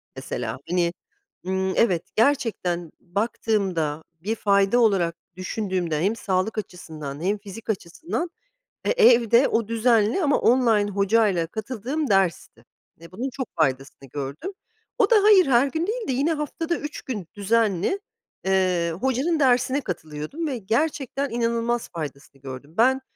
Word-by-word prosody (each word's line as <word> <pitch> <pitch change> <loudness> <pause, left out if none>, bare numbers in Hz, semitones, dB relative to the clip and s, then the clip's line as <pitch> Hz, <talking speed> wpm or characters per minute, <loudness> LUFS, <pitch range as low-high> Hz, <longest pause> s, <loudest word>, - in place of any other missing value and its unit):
mesela. 125 -3 -4
Hani, 175 -1 +1 0.5
ımm, 190 0 0
evet, 180 -8 +3
gerçekten 215 - +1
baktığımda, 185 -6 -1 0.2
bir 220 +3 -1
fayda 200 +3 +3
olarak 190 -7 +3 0.2
düşündüğümde 185 -4 -2
hem 205 +5 +1
sağlık 195 +2 -1
açısından 155 -6 -7
hem 205 +3 +1
fizik 205 +3 -11
açısından, 265 - -3 0.6
e, - - +1
evde 245 - +5
o 225 -2 0
düzenli 230 - +2
ama 285 -1 +3
online 225 -4 +3
hocayla 200 -3 +2
katıldığım 255 - -3
dersti 195 -4 0 0.3
ve 170 - -13
bunun 245 +9 -3
çok 260 -1 -5
faydasını 135 -3 -1
gördüm. 145 - -5 0.4
O 430 -5 +3
da, 465 - +6
hayır, 410 -4 +7
her 260 +1 +4
gün 320 +3 -3
değildi. 450 - -2
Yine 285 +6 +1
haftada 320 +3 -2
3 295 0 -6
gün 210 -10 -5
düzenli, 210 - +1 0.5
eee, 185 -3 +2
hocanın 265 +6 +1
dersine 255 +1 +3
katılıyordum 160 - -5
ve 265 -4 -2
gerçekten 275 +5 -1
inanılmaz 235 0 -1
faydasını 140 -4 -8
gördüm. 135 +3 -9
Ben 260 +4 +4
215 Hz, 130 wpm, -24 LUFS, 175-255 Hz, 0.6 s, hayır